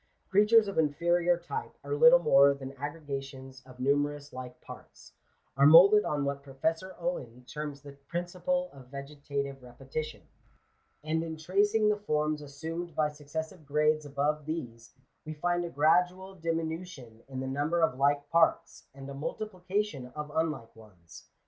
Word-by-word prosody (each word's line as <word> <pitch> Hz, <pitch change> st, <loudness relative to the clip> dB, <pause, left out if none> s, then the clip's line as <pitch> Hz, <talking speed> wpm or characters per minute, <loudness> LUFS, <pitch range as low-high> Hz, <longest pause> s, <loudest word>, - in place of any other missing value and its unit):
Creatures 210 Hz, +2 st, +5 dB
of 200 Hz, -, -1 dB
inferior 170 Hz, +3 st, +2 dB
type 440 Hz, -, -6 dB
are -, -, -4 dB
little 485 Hz, +2 st, +8 dB
more 140 Hz, -, +5 dB
than 135 Hz, -1 st, -8 dB
aggregations 135 Hz, -2 st, -7 dB
of 125 Hz, -1 st, -14 dB
numerous 145 Hz, +2 st, 0 dB
like 125 Hz, -1 st, -8 dB
parts -, -, -13 dB, 0.2 s
— -, -, -43 dB
are 140 Hz, +1 st, +7 dB
moulded 195 Hz, +7 st, +8 dB
on 145 Hz, -1 st, -1 dB
what 140 Hz, 0 st, -2 dB
Professor 160 Hz, +7 st, -3 dB
Owen 125 Hz, -8 st, -4 dB
terms 145 Hz, 0 st, -6 dB
the 140 Hz, -, -10 dB
principle 175 Hz, -, -3 dB
of 130 Hz, -2 st, -14 dB
ve 140 Hz, +1 st, -6 dB
getative 140 Hz, -1 st, -5 dB
repetition; 135 Hz, +5 st, -6 dB, 0.8 s
and 160 Hz, +1 st, 0 dB
in 160 Hz, -1 st, -5 dB
tracing 205 Hz, +6 st, +2 dB
the 210 Hz, 0 st, +2 dB
forms 150 Hz, -6 st, -1 dB
assumed 160 Hz, +4 st, -6 dB
by 150 Hz, -1 st, +2 dB
suc 145 Hz, -1 st, -15 dB
cessive 160 Hz, +3 st, -5 dB
grades 150 Hz, +1 st, +1 dB
above 145 Hz, +1 st, -1 dB
these, 120 Hz, -8 st, -6 dB, 0.3 s
we 155 Hz, 0 st, -7 dB
find 175 Hz, +3 st, 0 dB
a -, -, -5 dB
gradual 180 Hz, +5 st, +2 dB
diminution 165 Hz, -8 st, -4 dB
in 130 Hz, -1 st, -5 dB
the 130 Hz, -, -3 dB
number 145 Hz, +6 st, 0 dB
of 130 Hz, -5 st, +1 dB
like 145 Hz, +1 st, +2 dB
parts, 165 Hz, 0 st, +2 dB
and 135 Hz, 0 st, -9 dB
a 140 Hz, -, -7 dB
multiplication 185 Hz, -1 st, -3 dB
of 150 Hz, -1 st, -5 dB
unlike 155 Hz, -8 st, -2 dB
ones. 95 Hz, -7 st, -16 dB
150 Hz, 155 wpm, -30 LUFS, 140-175 Hz, 0.8 s, little